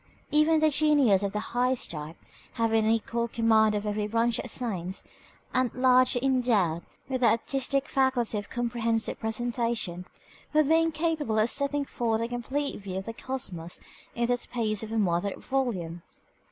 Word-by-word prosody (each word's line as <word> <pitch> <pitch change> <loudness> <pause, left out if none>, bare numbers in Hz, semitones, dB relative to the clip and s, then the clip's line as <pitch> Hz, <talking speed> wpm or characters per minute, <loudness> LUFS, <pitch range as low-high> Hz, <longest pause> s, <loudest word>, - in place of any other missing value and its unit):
Even 310 +1 +4
a 310 - +6
genius 285 -10 +4
of 200 -1 -1
the 210 - -2
highest 250 +1 +1
type, 155 +1 -7 0.4
having 225 -1 +1
an 220 - +3
equal 235 +1 0
command 220 -2 +3
of 205 0 -2
every 210 0 -1
branch 230 +1 +1
of - - -4
science, 190 -7 -2 0.5
and 255 -2 +1
largely 255 0 +3
endowed 225 -11 +2 0.3
with 260 -1 -2
the 240 - +5
artistic 270 +4 0
faculty 260 -4 +1
of 205 - -10
comprehensive 230 -2 -1
presentation, 225 -5 -2 0.5
would 305 -1 +4
be 320 +2 +5
incapable 315 -7 -1
of 215 +2 +3
setting 280 0 +1
forth 230 -4 -1
a 230 - -1
complete 255 +3 -3
view 190 -1 -5
of 190 - -4
the 225 - -5
cosmos 195 -10 -4 0.4
in 235 - +1
the 245 +1 +1
space 220 -4 -1
of 220 -1 -6
a 225 - -1
moderate 190 -1 0
volume. 190 -11 -2
235 Hz, 165 wpm, -27 LUFS, 210-260 Hz, 0.5 s, a